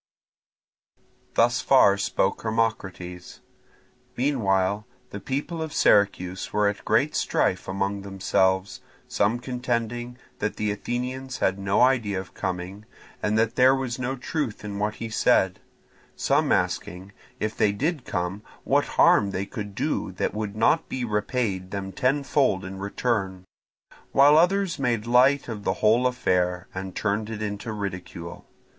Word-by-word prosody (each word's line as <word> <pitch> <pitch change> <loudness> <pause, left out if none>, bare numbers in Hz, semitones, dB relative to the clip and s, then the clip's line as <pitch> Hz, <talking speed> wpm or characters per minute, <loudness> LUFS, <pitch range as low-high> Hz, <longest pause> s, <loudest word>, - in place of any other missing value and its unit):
Thus - - +3
far 100 - +5
spoke 100 -1 0
Hermocrates. 100 -6 -3 0.8
Meanwhile 105 -6 +1 0.2
the 100 - -6
people 145 - -3
of 160 -2 -4
Syracuse 95 -2 +2
were 105 -1 +2
at 100 - -2
great - - +2
strife - - 0
among 100 +1 -2
themselves; 95 -1 0 0.3
some 105 +4 +1
contending 120 -1 -3 0.2
that 105 - -2
the 105 -1 -1
Athenians 125 +4 -4
had 95 +1 0
no 100 0 +1
idea 120 -7 +3
of 95 - -9
coming 95 +3 -5 0.4
and 105 +1 +1
that 115 0 +1
there 130 +1 +6
was 130 -2 -3
no 130 +1 -2
truth 125 -4 -4
in 100 -1 -5
what 105 +1 -1
he 115 - -5
said; 95 -4 +2 0.6
some - - +1
asking 95 +3 -1 0.3
if 110 +1 -2
they 105 - +3
did 145 +7 -2
come 90 +1 -3 0.2
what - - +2
harm 100 - +5
they 95 0 -3
could 105 -3 -7
do - - -1
that - - -2
would 105 -1 -4
not 115 +8 +2
be 125 -2 -2
repaid 105 -3 -1
them 95 -1 -5
tenfold 130 -5 +1
in 95 0 -7
return; 100 -2 -2 0.7
while 145 +2 +7
others 180 +1 +2
made 120 -5 0
light 130 +4 +4
of 110 -4 -6
the - - +1
whole 115 +4 +3
affair 90 -7 0
and 95 0 -6
turned 105 +1 -1
it 110 -1 -5
into 105 +2 -4
ridicule. 90 -4 -6
105 Hz, 140 wpm, -25 LUFS, 95-125 Hz, 0.8 s, while